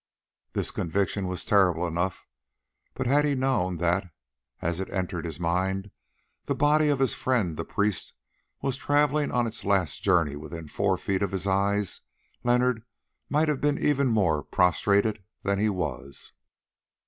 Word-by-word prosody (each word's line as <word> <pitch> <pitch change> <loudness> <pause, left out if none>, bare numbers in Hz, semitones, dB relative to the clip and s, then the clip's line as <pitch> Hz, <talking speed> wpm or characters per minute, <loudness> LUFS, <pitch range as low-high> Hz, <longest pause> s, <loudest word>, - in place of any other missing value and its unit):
This - - 0
conviction 95 +3 -1
was 90 0 -4
terrible 90 -4 +3
enough, 85 +2 -2 0.7
but 130 - -2
had 140 +4 +4
he 145 -1 +1
known 120 -10 0
that, 90 +3 0 0.5
as 85 +1 -2
it 95 - -4
entered 90 -3 -3
his 80 -2 -5
mind, 95 +3 -1 0.5
the - - -1
body 150 +1 +3
of 145 - +2
his 135 -1 +2
friend 115 -11 0
the - - -3
priest 105 -3 -1 0.5
was 135 -1 -1
travelling 145 +1 +2
on 120 -1 +2
its 115 - -5
last 95 -6 +1
journey 85 -7 +2
within 80 +2 -8
four 95 +4 0
feet 95 +1 -1
of 100 - +1
his 95 0 -3
eyes, 100 0 0 0.4
Leonard 125 -1 +2 0.5
might 150 +2 +2
have 150 -3 0
been 145 0 +2
even 140 -2 +2
more 95 -10 +2
prostrated 100 +6 +2 0.2
than 100 0 0
he 110 +1 +2
was. 70 -8 -5
100 Hz, 155 wpm, -27 LUFS, 90-125 Hz, 0.7 s, had